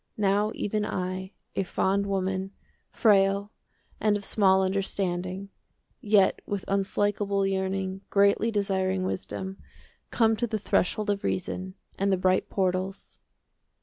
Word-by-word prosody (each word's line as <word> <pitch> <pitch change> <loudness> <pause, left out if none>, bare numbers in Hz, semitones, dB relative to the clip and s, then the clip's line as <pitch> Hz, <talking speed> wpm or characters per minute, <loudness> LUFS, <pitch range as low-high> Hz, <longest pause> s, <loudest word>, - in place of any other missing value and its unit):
Now 205 +1 +2
even 210 0 -1
I, 185 -1 -3 0.2
a - - +1
fond 195 +2 0
woman, 190 0 -2 0.4
Frail 200 -1 +3 0.5
and 210 -1 +2
of 200 - -7
small 190 -2 +4
understanding, 190 0 -2 0.5
20 210 - -10
Yet 195 -2 +4
with 200 -2 -3
unslakable 200 0 +1
yearning 190 0 -1
Greatly 200 +3 +3
desiring 190 -3 0
wisdom, 190 +1 -4 0.5
Come 225 -2 +3
to 240 - 0
the 220 -1 -1
threshold 210 +1 +1
of 200 -1 -3
reason 185 +1 -3 0.2
And 200 +1 +2
the 190 - +3
bright 185 0 +1
portals. 190 0 -2
195 Hz, 125 wpm, -27 LUFS, 190-205 Hz, 0.5 s, small